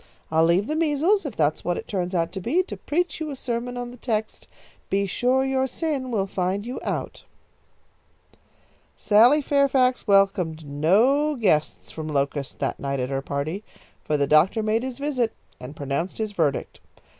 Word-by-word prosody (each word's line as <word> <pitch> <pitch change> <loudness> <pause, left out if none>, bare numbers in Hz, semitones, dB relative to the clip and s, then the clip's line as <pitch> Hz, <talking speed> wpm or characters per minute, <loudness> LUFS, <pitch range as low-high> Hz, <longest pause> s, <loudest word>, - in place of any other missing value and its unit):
I'll 160 +1 +4
leave 175 +4 +3
the 305 - -2
measles, 325 +4 +2
if 245 - -7
that's 155 -1 0
what 175 0 -1
it - - -7
turns 185 -2 -2
out 165 -1 0
to 190 - -5
be, 315 - +1
to - - -7
preach 335 +1 -2
you 315 -1 -3
a 285 - -5
sermon 245 -1 -3
on 245 0 -5
the 245 - -12
text, 220 -3 -3 0.4
'Be 200 +1 +1
sure 250 +7 +1
your 265 0 +1
sin 275 -1 -3
will 210 -5 0
find 190 +2 -2
you 250 +2 -5
out.'" - - -4 1.7
Sally 240 +8 +5
Fairfax 270 -3 +2
welcomed 195 -6 +2
no 220 - +2
guests 185 - 0
from 155 -1 -6
Locust 140 -1 -2
that 135 - -2
night 140 -1 -2
at 125 +1 -2
her 135 0 -1
party, 145 +8 -3 0.4
for 150 - 0
the 140 - +2
doctor 160 +10 +3
made 220 +1 +1
his 255 -1 -5
visit 275 -5 -1 0.3
and 130 +4 -9
pronounced 140 +6 -3
his 220 -1 -2
verdict. 155 -8 -1
210 Hz, 175 wpm, -24 LUFS, 160-260 Hz, 1.7 s, Sally